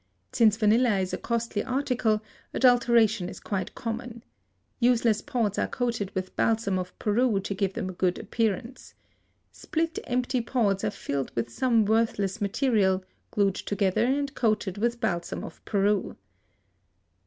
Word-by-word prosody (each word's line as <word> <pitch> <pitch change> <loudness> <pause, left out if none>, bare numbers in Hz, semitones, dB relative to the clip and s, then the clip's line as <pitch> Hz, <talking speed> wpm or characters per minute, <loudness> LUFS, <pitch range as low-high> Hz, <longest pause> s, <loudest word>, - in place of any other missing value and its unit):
Since 215 -3 +4
vanilla 225 0 +3
is 185 -1 -2
a - - 0
costly 235 -3 -2
article 250 -5 0 0.3
adulteration 235 -7 +4
is - - -9
quite 190 -3 -4
common. 230 0 -5 0.6
Useless 235 -3 +3
pods 235 -8 -1
are - - +1
coated 235 -6 -2
with 185 0 -4
balsam 220 -4 +1
of 180 0 -7
Peru 220 0 +2
to 200 - -3
give 195 -1 -1
them 185 - -3
a 185 - -5
good 180 0 0
appearance. 230 +2 -3 0.6
Split, 330 +1 -2
empty 250 0 0
pods 215 -5 0
are 215 - +1
filled 140 -9 -4
with 115 0 -2
some 230 - +2
worthless 215 -2 +1
material, 200 -3 +1 0.2
glued 200 -2 +2
together 200 +1 0
and 280 +2 0
coated 210 -5 0
with 235 +2 0
balsam 170 -5 -2
of 165 - -10
Peru. 205 -1 0
220 Hz, 145 wpm, -27 LUFS, 195-240 Hz, 0.6 s, Since